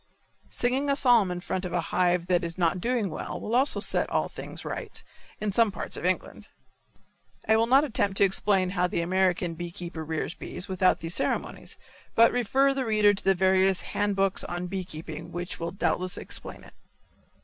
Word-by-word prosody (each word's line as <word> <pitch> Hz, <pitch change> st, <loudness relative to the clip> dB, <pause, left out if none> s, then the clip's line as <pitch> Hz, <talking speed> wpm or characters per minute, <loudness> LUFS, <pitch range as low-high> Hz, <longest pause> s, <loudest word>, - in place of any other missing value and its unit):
Singing 260 Hz, +4 st, 0 dB
a 280 Hz, -, +3 dB
psalm 240 Hz, -8 st, +4 dB
in 180 Hz, 0 st, -4 dB
front 185 Hz, +1 st, -3 dB
of 180 Hz, -2 st, -5 dB
a 175 Hz, -, +1 dB
hive 180 Hz, -1 st, +2 dB
that 180 Hz, -1 st, +1 dB
is 170 Hz, 0 st, -4 dB
not 175 Hz, 0 st, +1 dB
doing 235 Hz, -5 st, 0 dB
well -, -, -5 dB
will 220 Hz, -, -5 dB
also 265 Hz, +4 st, +3 dB
set -, -, +1 dB
all -, -, 0 dB
things -, -, -8 dB
right, -, -, -6 dB, 0.4 s
in 210 Hz, -1 st, -1 dB
some 225 Hz, +1 st, +3 dB
parts 185 Hz, -, -4 dB
of -, -, -2 dB
England. 185 Hz, -, -3 dB, 1.0 s
I 220 Hz, -, +5 dB
will 225 Hz, +1 st, +3 dB
not 270 Hz, +4 st, +5 dB
attempt 205 Hz, -8 st, 0 dB
to -, -, +6 dB
explain 195 Hz, -1 st, +2 dB
how 180 Hz, -2 st, +1 dB
the 170 Hz, -, -2 dB
American 180 Hz, -1 st, +1 dB
bee 175 Hz, +1 st, -6 dB
keeper 170 Hz, -2 st, -6 dB
rears 160 Hz, +1 st, -3 dB
bees 180 Hz, -, -5 dB
without 185 Hz, -1 st, +2 dB
these 165 Hz, +1 st, -4 dB
ceremonies, -, -, -3 dB, 0.4 s
but 230 Hz, 0 st, +6 dB
refer 265 Hz, +3 st, +2 dB
the 270 Hz, -1 st, -2 dB
reader 215 Hz, -3 st, +4 dB
to 195 Hz, -, -3 dB
the 195 Hz, 0 st, +3 dB
various 190 Hz, 0 st, +3 dB
hand 205 Hz, -1 st, -1 dB
books 195 Hz, 0 st, +1 dB
on 175 Hz, +1 st, -4 dB
bee 185 Hz, 0 st, -4 dB
keeping 155 Hz, -2 st, -8 dB
which 175 Hz, +1 st, -5 dB
will 170 Hz, 0 st, -3 dB
doubtless 185 Hz, 0 st, -1 dB
explain -, -, -6 dB
it. -, -, -16 dB
190 Hz, 195 wpm, -27 LUFS, 175-215 Hz, 1.0 s, to